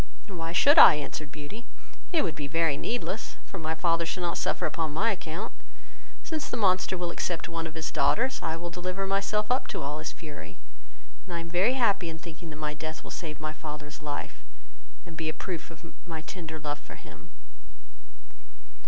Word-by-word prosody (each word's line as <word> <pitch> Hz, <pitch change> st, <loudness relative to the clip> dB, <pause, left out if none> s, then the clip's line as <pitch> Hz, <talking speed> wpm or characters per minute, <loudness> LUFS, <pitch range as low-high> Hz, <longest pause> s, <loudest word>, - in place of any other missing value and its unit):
"Why 165 Hz, -4 st, -3 dB
should 285 Hz, -, +7 dB
I, -, -, +12 dB
(answered 150 Hz, 0 st, -4 dB
Beauty,) 155 Hz, +11 st, -8 dB, 0.4 s
it 335 Hz, -, +4 dB
would 170 Hz, -, 0 dB
be 145 Hz, -, -4 dB
very 165 Hz, -1 st, +3 dB
needless, 225 Hz, +4 st, -2 dB
for 195 Hz, -, -7 dB
my 160 Hz, 0 st, -1 dB
father 165 Hz, +1 st, +3 dB
shall 170 Hz, +2 st, -2 dB
not 170 Hz, -, 0 dB
suffer -, -, +1 dB
upon 160 Hz, -2 st, -1 dB
my 220 Hz, +9 st, +3 dB
account, 190 Hz, +3 st, -4 dB, 0.7 s
since 315 Hz, -2 st, -2 dB
the -, -, -1 dB
monster 185 Hz, -3 st, +3 dB
will 175 Hz, -1 st, -1 dB
accept 170 Hz, -1 st, -1 dB
of 165 Hz, -, -10 dB
one 165 Hz, -1 st, -1 dB
of 160 Hz, -, -10 dB
his 160 Hz, 0 st, -2 dB
daughters, 260 Hz, +3 st, +3 dB
I 160 Hz, 0 st, -1 dB
will 170 Hz, +1 st, -4 dB
deliver 185 Hz, +2 st, -2 dB
myself 200 Hz, +3 st, +1 dB
up 255 Hz, -, +2 dB
to -, -, -3 dB
all 145 Hz, +2 st, -2 dB
his 155 Hz, -, -3 dB
fury, 115 Hz, -, -9 dB, 0.7 s
and 175 Hz, -, -4 dB
I -, -, +1 dB
am 165 Hz, 0 st, -6 dB
very 190 Hz, +8 st, +4 dB
happy 205 Hz, -9 st, +3 dB
in 160 Hz, -, -5 dB
thinking 165 Hz, 0 st, -9 dB
that 155 Hz, -, -7 dB
my 150 Hz, 0 st, -2 dB
death 155 Hz, +1 st, -5 dB
will -, -, -9 dB
save 155 Hz, -3 st, -5 dB
my 155 Hz, 0 st, -3 dB
father's 150 Hz, -1 st, -7 dB
life, 150 Hz, -1 st, -5 dB, 0.6 s
and 170 Hz, -2 st, -9 dB
be 160 Hz, -1 st, -1 dB
a -, -, -2 dB
proof 175 Hz, -4 st, -4 dB
of 165 Hz, 0 st, -11 dB
my 160 Hz, -2 st, -4 dB
tender 160 Hz, -2 st, -6 dB
love 145 Hz, -1 st, -2 dB
for -, -, -11 dB
him." 80 Hz, +2 st, -13 dB
165 Hz, 200 wpm, -29 LUFS, 155-190 Hz, 0.7 s, I